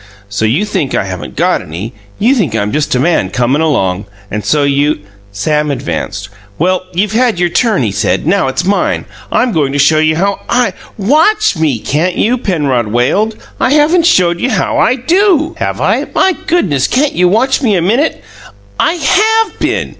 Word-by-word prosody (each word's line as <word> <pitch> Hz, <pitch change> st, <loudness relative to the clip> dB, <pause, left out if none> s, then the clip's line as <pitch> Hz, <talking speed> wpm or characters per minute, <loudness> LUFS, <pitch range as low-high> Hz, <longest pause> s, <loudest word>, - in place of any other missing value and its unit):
"So 100 Hz, +2 st, -1 dB
you 140 Hz, -, +1 dB
think 185 Hz, -9 st, -2 dB
I -, -, +1 dB
haven't 95 Hz, -2 st, -7 dB
got -, -, +1 dB
any; 90 Hz, +10 st, -7 dB, 0.2 s
you 240 Hz, +6 st, +3 dB
think 180 Hz, -, 0 dB
I'm 105 Hz, -1 st, -1 dB
just 150 Hz, -1 st, 0 dB
a -, -, +1 dB
man 145 Hz, -, +1 dB
comin' 125 Hz, +7 st, 0 dB
along, 100 Hz, -, 0 dB, 0.3 s
and 105 Hz, 0 st, -3 dB
so 145 Hz, +8 st, +1 dB
you 140 Hz, +1 st, +1 dB
" 100 Hz, 0 st, -28 dB
Sam 150 Hz, +5 st, 0 dB
advanced. 115 Hz, -7 st, -4 dB, 0.3 s
"Well, 185 Hz, +2 st, 0 dB
you've 195 Hz, +3 st, -1 dB
had 230 Hz, -4 st, +1 dB
your 175 Hz, -1 st, +2 dB
turn," 215 Hz, -, +1 dB
he 105 Hz, -, -1 dB
said. 100 Hz, +6 st, -1 dB
"Now, 180 Hz, -2 st, +1 dB
it's 145 Hz, +7 st, -2 dB
mine. 200 Hz, +2 st, 0 dB, 0.3 s
I'm 245 Hz, -, +1 dB
goin' 150 Hz, -7 st, 0 dB
to -, -, -1 dB
show 150 Hz, +3 st, +3 dB
you 155 Hz, 0 st, +2 dB
how 200 Hz, +4 st, 0 dB
I 245 Hz, 0 st, +1 dB, 0.2 s
" -, -, -28 dB
"WATCH 315 Hz, -, +2 dB
me, 155 Hz, -6 st, +1 dB
can't 160 Hz, +10 st, -1 dB
you?" 245 Hz, +3 st, +1 dB
Penrod 145 Hz, -, -1 dB
wailed. 135 Hz, -, 0 dB, 0.2 s
"I 260 Hz, -, +2 dB
haven't 325 Hz, +3 st, +3 dB
showed 175 Hz, -, +2 dB
you 265 Hz, -, 0 dB
how -, -, 0 dB
I 250 Hz, -, +3 dB
do, 335 Hz, -, +1 dB
have -, -, -2 dB
I? -, -, 0 dB
My 380 Hz, -2 st, +3 dB
goodness! 145 Hz, -, +1 dB
Can't 280 Hz, +3 st, +1 dB
you 180 Hz, 0 st, +2 dB
watch 240 Hz, +9 st, +1 dB
me 220 Hz, -7 st, +2 dB
a -, -, +2 dB
minute?" 240 Hz, -, 0 dB, 0.6 s
"I -, -, +2 dB
HAVE 430 Hz, +9 st, +1 dB
been! -, -, -1 dB
175 Hz, 195 wpm, -12 LUFS, -, 0.6 s, you